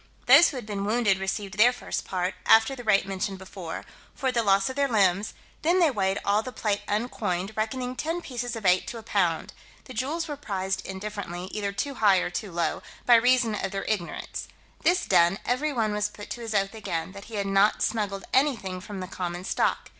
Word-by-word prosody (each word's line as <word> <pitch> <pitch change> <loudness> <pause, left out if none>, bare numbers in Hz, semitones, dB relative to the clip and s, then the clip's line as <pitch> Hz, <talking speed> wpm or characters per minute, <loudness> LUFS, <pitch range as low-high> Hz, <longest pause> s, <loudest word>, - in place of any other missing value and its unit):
Those 280 +7 +8
who 275 - -6
had 245 - -6
been 205 -2 -3
wounded 210 -3 +2
received 195 +1 -3
their 240 +3 +7
first 245 - -4
part, 185 0 -1
after 225 +5 +6
the 245 - -8
rate 200 -3 +3
mentioned 195 0 -3
before, 185 -3 -7 0.3
for 265 -2 0
the 240 -2 +1
loss 195 -2 +3
of 260 - -4
their 280 0 +2
limbs: 200 -3 +2 0.3
then 345 +4 +3
they 330 -4 +5
weighed 195 -4 0
all 205 +1 +3
the 255 - -7
plate 210 -4 -1
uncoined, 205 -3 -2
reckoning 250 +3 -2
ten 325 +6 -2
pieces 245 -6 -4
of 220 -3 -7
eight 180 0 +4
to 235 - -5
a 225 - -9
pound; 180 -7 0 0.3
the 255 - -10
jewels 295 +8 -2
were 295 - -4
prized 190 -8 -3
indifferently, 190 -2 -5
either 200 -2 -2
too 280 +8 -3
high 205 -6 +4
or 180 - -1
too 200 +1 -4
low, 170 0 -1 0.2
by 245 - +6
reason 240 -1 +4
of 210 - -2
their 195 0 -4
ignorance: 200 -6 -3 0.3
this 360 +1 +2
done, 170 +3 +4
every 280 +5 0
one 225 -5 0
was 210 0 0
put 205 0 -11
to 240 - -5
his 225 -2 -4
oath 195 0 +1
again, 185 -6 -4
that 200 +1 -10
he 225 - -9
had 200 -1 -1
not 195 +2 +3
smuggled 205 -3 -1
anything 230 -10 +1
from 195 0 -7
the 185 - -5
common 180 -1 -4
stock. - - 0
210 Hz, 215 wpm, -26 LUFS, 195-245 Hz, 0.3 s, Those